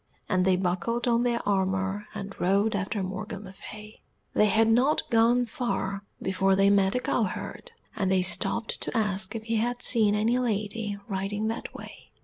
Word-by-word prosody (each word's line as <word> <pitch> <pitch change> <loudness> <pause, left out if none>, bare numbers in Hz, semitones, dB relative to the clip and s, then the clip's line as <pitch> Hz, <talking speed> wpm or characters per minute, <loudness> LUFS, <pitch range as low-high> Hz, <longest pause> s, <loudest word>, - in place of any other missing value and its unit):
And 185 0 +1
they 190 -1 +4
buckled 185 +7 -1
on 235 -1 +3
their 240 -2 -1
armour 190 +1 0
and 200 -1 -6
rode 200 +4 +2
after 200 +1 -2
Morgan 200 +2 -6
le 190 - -10
Fay. 210 +2 -11 0.3
They 210 - +4
had 220 +2 +3
not 250 +7 +3
gone 235 +2 +4
far 200 -4 -3
before 190 0 +1
they 195 +1 +4
met 195 +1 +3
a - - +2
cowherd, 250 - -3 0.2
and 195 -4 0
they 185 -1 +2
stopped 225 +4 +1
to - - -3
ask 195 -2 -1
if 220 - -4
he 225 0 -1
had 245 +2 -1
seen 215 -4 +4
any 230 +4 +2
lady 210 -2 -2
riding 205 +2 -2
that 225 - -5
way. - - -11
210 Hz, 175 wpm, -27 LUFS, 195-230 Hz, 0.3 s, they